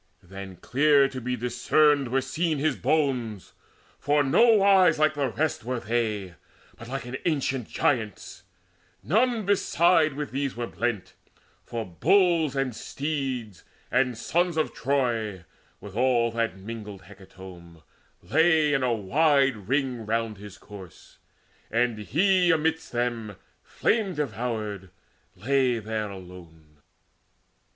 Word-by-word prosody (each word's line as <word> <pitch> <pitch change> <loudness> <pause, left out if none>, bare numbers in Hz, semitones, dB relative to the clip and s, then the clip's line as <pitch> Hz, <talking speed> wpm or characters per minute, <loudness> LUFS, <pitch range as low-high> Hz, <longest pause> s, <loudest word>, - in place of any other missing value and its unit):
Then 95 +1 -9
clear 140 - +3
to 130 -1 -7
be 125 +1 -2
discerned 135 +4 +2
were 130 +2 0
seen 155 +5 -1
His 155 +2 0
bones; 125 - -1 0.5
for 145 0 +2
nowise 195 - +5
like 155 0 +3
the 140 -3 -1
rest 155 +5 -2
were 125 +1 -3
they, 105 -4 -2 0.4
But 120 - -12
like 135 0 -4
an 125 +2 -5
ancient 135 -7 -1
Giant's; 110 -8 -2 0.6
none 225 - +1
beside 170 -5 +3
With 150 +1 -5
these 135 0 -2
were 120 0 -3
blent; 115 -4 -3 0.5
for 115 -2 -5
bulls 160 - +2
and 135 -4 -1
steeds, 135 - -4 0.3
and 125 -2 +1
sons 175 +6 0
Of 155 - 0
Troy, 115 -8 -1 0.3
with 100 -1 -11
all 120 -1 +2
that 115 -3 -2
mingled 105 -1 -8
hecatomb, 95 -4 -14 0.4
Lay 160 -1 +3
in 135 - +1
a 125 -2 +1
wide 135 - +2
ring 130 -5 -1
round 115 -2 -2
his 105 -1 -11
corse, 100 -5 -14 0.5
and 120 -1 0
he 180 - +2
Amidst 160 0 0
them, 120 -4 -2 0.3
flame 205 -6 0
devoured, 110 -7 -4 0.5
lay 130 0 +1
there 110 -1 -4
alone. 85 -5 -13
125 Hz, 125 wpm, -26 LUFS, 105-150 Hz, 0.6 s, nowise